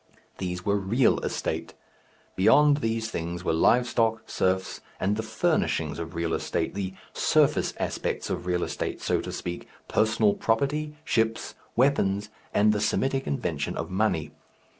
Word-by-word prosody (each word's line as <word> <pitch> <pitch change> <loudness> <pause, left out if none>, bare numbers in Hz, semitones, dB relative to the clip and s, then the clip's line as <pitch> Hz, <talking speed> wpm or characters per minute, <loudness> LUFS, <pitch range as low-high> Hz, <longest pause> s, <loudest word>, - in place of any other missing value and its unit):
These 90 -1 -4
were 100 0 +2
"real" 110 +6 +2
estate. - - -3 0.6
Beyond 145 +9 +5
these 115 -4 -1
things 85 +1 -4
were 80 - +1
live 120 +9 +4
stock, 115 -2 +1
serfs, 95 0 -1 0.2
and 100 +3 +1
the 110 - -1
furnishings 110 - 0
of 85 +1 -6
real 85 -1 -1
estate, - - -1
the 95 -1 -4 0.2
surface - - +2
aspect - - -2
of 90 - -3
real 90 -1 +1
estate, - - -3
so - - 0
to - - -6
speak, 85 0 -5 0.2
personal 110 -1 +3
property, 145 +6 0
ships, 115 -3 0 0.2
weapons, 105 -6 +2 0.2
and 105 +1 +4
the 105 - -1
Semitic 135 +5 0
invention 70 - -2
of - - -4
money. 95 -7 0
105 Hz, 145 wpm, -27 LUFS, 90-115 Hz, 0.6 s, Beyond